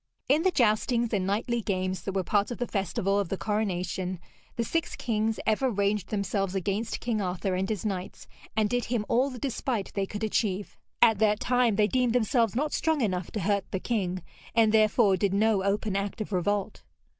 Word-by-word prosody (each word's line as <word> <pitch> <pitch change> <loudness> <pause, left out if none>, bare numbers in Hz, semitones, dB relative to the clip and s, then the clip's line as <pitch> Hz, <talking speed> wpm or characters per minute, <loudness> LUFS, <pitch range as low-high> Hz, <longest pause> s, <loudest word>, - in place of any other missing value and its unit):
In 290 +4 +4
the 375 - +3
joustings 235 -2 +2
and 190 -2 0
knightly 230 +4 0
games 185 -2 -2
that 195 - -4
were 190 -1 0
part 200 +3 +1
of 240 - -5
the 245 - -1
festival 195 -1 0
of 200 -4 -2
the 195 - -2
coronation, 185 -4 -2 0.4
the 235 - 0
six 330 +7 -2
kings 220 -2 -1
ever 220 +5 +2
ranged 200 -2 0
themselves 200 -2 -1
against 200 +4 -2
King 225 -3 -1
Arthur 185 0 -2
and 190 +1 -1
his 215 -1 -3
knights, 190 -3 -4 0.3
and 215 -1 +3
did 245 +2 -1
him 230 -3 -1
all 255 +4 +2
the 255 - -8
despite 245 -4 -2
they 195 -1 -1
could 210 +2 -6
achieve. 205 -2 -1 0.3
At 225 -4 +5
that 210 -1 +3
time 245 -3 +2
they 210 - +4
deemed 250 +1 +1
themselves 230 -1 +2
not 295 +4 0
strong 320 -3 +1
enough 185 -6 -1
to 210 - -2
hurt 200 +1 0
the 190 - -2
king, 185 -5 -2 0.3
and 225 -2 +5
therefore 215 -2 +4
did 195 +1 +1
no 210 -1 +3
open 200 +1 0
act 200 +2 -2
of 215 - -4
revolt. 195 +2 -1
210 Hz, 200 wpm, -28 LUFS, 195-230 Hz, 0.4 s, At